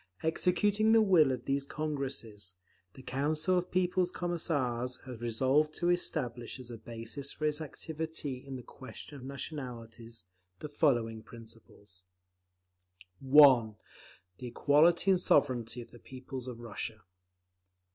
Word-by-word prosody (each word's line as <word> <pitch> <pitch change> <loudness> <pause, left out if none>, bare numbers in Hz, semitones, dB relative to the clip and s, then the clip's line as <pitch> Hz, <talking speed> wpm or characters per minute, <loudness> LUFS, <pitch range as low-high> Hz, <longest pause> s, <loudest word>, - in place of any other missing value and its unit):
Executing 205 +6 +2
the 225 - +7
will 170 -9 +5
of 125 -1 -4
these 140 0 0
Congresses, 135 - -4 0.4
the 130 - -12
Council 155 +7 0
of 180 0 0
People's 180 0 +1
Commissars 140 -9 -1
has 125 -3 -8
resolved 130 +6 +1
to 175 0 +1
establish 125 -8 -1
as 125 -1 -9
a 115 - -7
basis 115 +5 -5
for 155 - -4
its 150 +1 0
activity 155 -3 -5
in 135 -1 -7
the 125 - -7
question 130 +4 -11
of 135 - -10
Nationalities, 120 - -7 0.3
the 150 - -7
following 120 -7 +1
principles: 110 -4 -13 1.2
(1) 130 -5 +6 0.6
The 125 - -6
equality 160 +9 +4
and 185 -1 +3
sovereignty 120 -3 +2
of - - -19
the 120 - -14
peoples 130 0 -8
of 120 -2 -7
Russia. 110 -2 -6
135 Hz, 130 wpm, -31 LUFS, 120-155 Hz, 1.2 s, the